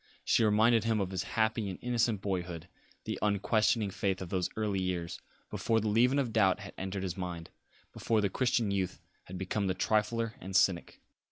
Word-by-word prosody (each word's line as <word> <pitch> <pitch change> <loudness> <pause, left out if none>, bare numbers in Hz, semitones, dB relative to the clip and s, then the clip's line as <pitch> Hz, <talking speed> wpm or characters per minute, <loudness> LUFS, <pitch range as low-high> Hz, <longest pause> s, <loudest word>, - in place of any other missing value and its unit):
She - - +3
reminded 110 +2 +4
him 115 -1 +1
of 95 -2 -2
his 95 -2 -2 0.2
happy 110 -1 +1
and 95 - -5
innocent 115 -4 0
boyhood, 90 -4 -3 0.4
the - - -4
unquestioning 105 +1 +2
faith 95 0 -1
of 95 - -6
those 90 -1 -1
early 105 -3 -1
years, 90 -2 -3 0.3
before 115 0 +1
the 110 0 -1
leaven 125 +6 +3
of 125 -5 0
doubt 100 -2 +3
had 100 - -9
entered 95 0 -4
his 90 -3 -3
mind, 90 -3 -5 0.4
before 115 -2 0
the 105 - +2
Christian 115 0 +1
youth 95 -2 -2 0.3
had 95 - -8
become 95 +2 -1
the 95 - 0
trifler 110 +3 0
and 95 +2 -6
cynic. 95 -3 +2
100 Hz, 185 wpm, -31 LUFS, 95-110 Hz, 0.4 s, reminded